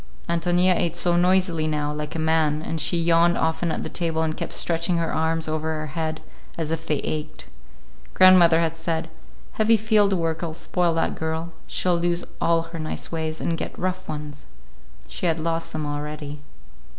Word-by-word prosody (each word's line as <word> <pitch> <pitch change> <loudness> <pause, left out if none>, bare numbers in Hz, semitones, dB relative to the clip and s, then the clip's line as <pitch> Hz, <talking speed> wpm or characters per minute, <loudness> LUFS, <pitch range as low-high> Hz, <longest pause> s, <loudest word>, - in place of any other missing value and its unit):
Ántonia 175 +2 +2
ate 170 -1 0
so 175 0 +2
noisily 175 -2 +2
now, 150 -1 -1
like 150 +1 -5
a - - 0
man, 160 -1 +1
and 160 -1 -2
she 170 +3 +1
yawned 170 +1 +3
often 160 +1 0
at - - -3
the - - -4
table 165 -2 -1
and 155 -1 -1
kept - - -5
stretching 170 +1 0
her 165 -1 -1
arms 160 0 0
over 155 0 -1
her 155 0 -4
head, 155 +1 -3 0.4
as 160 -2 -2
if 165 0 -3
they 150 - +1
ached. 155 0 -4 0.7
Grandmother 175 -3 +7
had 165 -1 0
said, 165 0 -3 0.4
"Heavy 225 +1 +3
field 210 -2 +3
work'll 165 -2 -2
spoil 170 0 0
that 165 - +1
girl. 160 +1 -3 0.2
She'll 180 -2 +1
lose 175 0 0 0.2
all 165 0 +3
her 165 0 -8
nice 155 0 -4
ways 160 -1 -3
and 170 - -1
get - - -6
rough 185 0 -3
ones." 150 -1 -7 0.6
She - - -3
had 165 0 +1
lost 165 +1 -2
them 155 -1 -3
already. 150 0 -5
165 Hz, 180 wpm, -24 LUFS, 155-170 Hz, 0.7 s, Grandmother